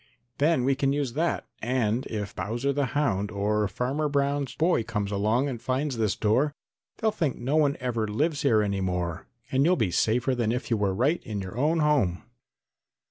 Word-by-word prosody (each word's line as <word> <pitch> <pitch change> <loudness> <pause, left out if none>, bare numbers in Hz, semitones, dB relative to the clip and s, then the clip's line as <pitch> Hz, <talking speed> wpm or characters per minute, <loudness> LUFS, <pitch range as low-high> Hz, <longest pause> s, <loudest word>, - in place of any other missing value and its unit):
"Then 150 -2 +3
we 135 +2 +3
can 135 0 +1
use 140 -4 -1
that, 165 +4 0 0.2
and 120 0 0
if 105 -3 -5
Bowser 120 +6 -1
the 140 -1 0
Hound 105 -9 +1
or 105 +1 0
Farmer 135 +9 -1
Brown's 140 -1 0
boy 165 -5 +2
comes 105 -3 -3
along 110 +7 +1
and 120 -5 -5
finds 130 0 -1
this 110 -4 +1
door 130 +8 +1 0.4
they'll 220 -1 +1
think 160 -10 -1
no 130 +5 -1
one 145 -2 +3
ever 120 -4 -1
lives 145 +8 0
here 115 -8 +3
any 100 -1 -1
more 90 -3 -2 0.2
and 135 +1 +3
you'll 175 +4 +4
be 110 - 0
safer 120 +8 +2
than 120 -3 0
if 125 +1 -3
you 115 - +3
were 100 -2 0
right 140 - +1
in 105 -4 -4
your 95 0 -6
own 155 +6 +2
home." 135 -13 +2
125 Hz, 190 wpm, -27 LUFS, 105-145 Hz, 0.4 s, you'll